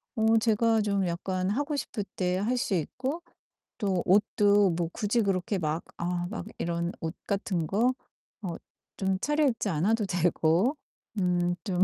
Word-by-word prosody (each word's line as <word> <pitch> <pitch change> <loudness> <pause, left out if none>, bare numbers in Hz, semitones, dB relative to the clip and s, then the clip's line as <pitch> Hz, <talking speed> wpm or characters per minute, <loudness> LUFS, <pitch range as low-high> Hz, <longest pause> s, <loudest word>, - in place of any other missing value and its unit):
어 220 0 +4
제가 225 0 +3
좀 200 -2 +1
약간 185 +2 -1
하고 290 +8 -1
싶을 230 -6 -3
때 180 -1 0
할 230 +6 0
수 225 - -1
있고 260 - -2 0.6
또 190 -4 0
옷도 205 +1 +4
뭐 165 0 -1
굳이 225 +1 +1
그렇게 195 0 0
막 160 -1 -1
아 175 0 -2
막 220 - -5
이런 170 0 -1
옷 160 +1 -3
같은 195 -4 -1
거 235 +8 +2 0.5
어 175 -3 -3 0.4
좀 190 -1 +1
차려입지 290 -8 +1
않아도 205 +7 +1
되고 175 - +2 0.4
음 175 -1 +1
좀 185 -3 +2
195 Hz, 235 characters per minute, -28 LUFS, 175-220 Hz, 0.6 s, 어